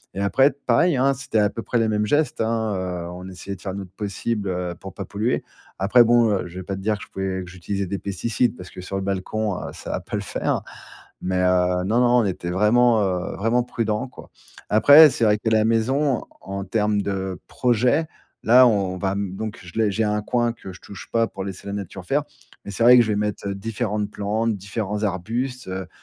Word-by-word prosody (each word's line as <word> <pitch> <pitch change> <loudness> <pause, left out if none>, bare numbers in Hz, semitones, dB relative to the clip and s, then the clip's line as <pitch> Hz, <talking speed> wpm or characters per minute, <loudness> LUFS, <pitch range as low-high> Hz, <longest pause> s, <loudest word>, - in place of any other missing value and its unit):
et 95 - -4
après 130 +8 +4 0.2
pareil, 135 +5 +3
hein, 135 +2 +3
c'était 135 -4 -3
à 105 -1 +3
peu 115 - -5
près 120 - -1
les 115 -1 +2
mêmes 105 0 +1
gestes, 145 -3 +1
hein, 110 -1 0
heu, 90 -2 -4
on 90 +1 -8
essayait 95 +2 -7
de 90 - -16
faire 95 -1 -5
notre 95 -2 -7
possible, 100 +1 -3
heu, 90 -1 -2
pour 95 +2 -10
pas 100 - -6
polluer. 110 +6 -1 0.3
Après 105 +6 +5
bon, 115 -1 +4
heu, 95 -3 -1
je 85 - -13
vais - - -6
pas 95 +2 -4
te 95 - -7
dire 105 +1 0
que - - -10
je - - -28
pouvais 95 -1 -3
que - - -12
j'utilisais 95 +2 -4
des 95 +2 -4
pesticides 110 +4 -1
parce 90 0 -10
que 90 - -9
sur 95 +2 -6
le 95 - -3
balcon, 100 +1 -2
heu, - - -6
ça - - -7
va - - -1
pas - - -6
le - - -1
faire, - - -2 0.6
mais, 90 0 -1
heu, 90 0 +2
non, 115 +5 +2
non, 125 0 +4
on - - -1
était 90 -2 -3
vraiment, 110 +4 +4
heu, 90 -2 -2
vraiment 115 +4 +1
prudents, 115 0 -2
quoi. - - -14 0.4
Après, 145 +8 +8
c'est 115 - 0
vrai 105 0 +4
que 110 - -6
la 110 -1 +4
maison, 120 +4 +1 0.2
en 100 0 -5
termes 105 +1 +1
de 95 -2 -3
projet, 125 +6 +1 0.4
là 125 +2 +7
on 95 -4 0
va 95 -1 0
m 100 -1 -3
donc 110 0 -5
je 90 -2 -12
l'ai 110 -2 +3
j'ai 110 +3 0
un 105 0 0
coin 120 +2 0
que 95 -5 -10
je 90 - -12
touche 100 - -11
pas 115 0 +3
pour 95 -3 -7
laisser 95 -1 -7
la 100 - -4
nature 95 -2 -6
faire, 145 +6 +1 0.4
mais 100 - -7
c'est 115 - -1
vrai 125 +1 +9
que - - +8
je 110 - -4
vais 105 - +1
mettre 105 -1 -2
différentes 105 +1 -3
plantes, 110 +2 -1
différents 105 +1 -4
arbustes, 115 +6 -3
heu, 95 -1 -5
105 Hz, 235 wpm, -23 LUFS, 95-115 Hz, 0.6 s, vrai